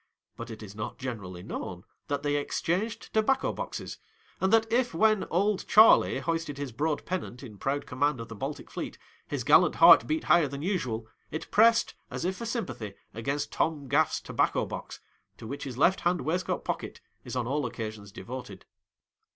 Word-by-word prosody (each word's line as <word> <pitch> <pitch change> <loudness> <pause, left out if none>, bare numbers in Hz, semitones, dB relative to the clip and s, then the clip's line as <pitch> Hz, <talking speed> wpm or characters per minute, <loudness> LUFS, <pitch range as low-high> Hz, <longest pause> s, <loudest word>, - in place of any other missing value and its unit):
But 115 0 -7
it 110 -1 -8
is 100 -2 -9
not 105 0 -5
generally 100 -9 -6
known - - -6 0.2
that 145 0 -2
they 145 0 +1
exchanged 190 +10 -2
tobacco 240 +5 +2
boxes, - - -6 0.4
and 190 +1 +1
that 225 0 +5
if 245 -6 +1
when 215 +2 +3
"Old 200 +3 0
Charley" 220 +1 +7
hoisted 165 -4 -2
his 140 -2 -4
broad 150 +5 -1
pennant 170 -8 -4
in 105 -6 -10
proud 140 +1 -1
command 140 +1 0
of 115 - -6
the - - -8
Baltic 135 +7 -6
fleet, - - -5 0.3
his - - -3
gallant - - +5
heart - - +8
beat 315 0 0
higher 170 -4 +4
than 140 +1 -6
usual, 125 - -1 0.2
it 160 - -6
pressed, 230 +2 +5 0.2
as - - -4
if 190 +1 0
for 230 - -5
sympathy, 120 - -4 0.2
against 135 +6 -2
Tom 150 -4 -1
Gaff's 150 +4 +2
tobacco - - 0
box, - - -7 0.4
to - - -10
which 140 +6 -5
his 130 -3 -6
left 180 +7 +4
hand 175 +1 +1
waistcoat 180 +4 -1
pocket - - -4 0.2
is - - -6
on 125 -2 0
all 140 +1 -1
occasions 110 -3 -6
devoted. 105 -1 -8
145 Hz, 180 wpm, -28 LUFS, 120-185 Hz, 0.4 s, heart